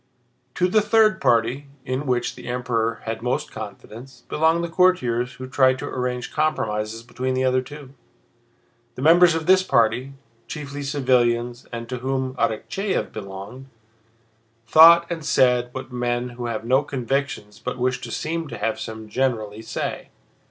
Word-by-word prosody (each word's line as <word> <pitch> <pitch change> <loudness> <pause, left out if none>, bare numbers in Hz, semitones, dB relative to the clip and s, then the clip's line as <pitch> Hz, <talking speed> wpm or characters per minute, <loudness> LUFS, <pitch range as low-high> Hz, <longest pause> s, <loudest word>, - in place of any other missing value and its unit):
To 180 - +2
the 215 +4 +3
third 215 -1 +3
party—in 130 +3 -1
which 125 -1 0
the - - -11
Emperor 120 -2 -1
had 115 0 -4
most 125 +1 -2
confidence—belonged 135 +8 -3
the - - -1
courtiers 130 -9 +2
who 130 0 -8
tried 130 0 +3
to - - -6
arrange 125 -1 -3
compromises 115 -8 -1
between 130 +2 -3
the 130 - 0
other 130 0 +2
two. 140 0 -11 1.0
The 130 - -6
members 170 +2 +6
of 160 -1 -2
this 185 +2 +5
party, 125 -4 +1 0.3
chiefly 145 -2 -6
civilians 125 -3 0
and 115 0 -6
to 125 +1 -5
whom 130 0 -2
Arakchéev 190 - -1
belonged, 100 +6 -8 1.0
thought 165 +7 +8
and 170 -2 -5
said 125 -3 +3
what 130 +1 -7
men 120 0 -1
who 120 0 -6
have 115 -1 -4
no 130 +3 +3
convictions 135 -5 -3
but 125 0 -5
wish 125 0 -1
to 120 - -7
seem 160 +7 -3
to - - -7
have 110 0 -2
some 110 0 -7
generally 110 -3 -2
say. 115 - -5
130 Hz, 150 wpm, -23 LUFS, 120-145 Hz, 1.0 s, thought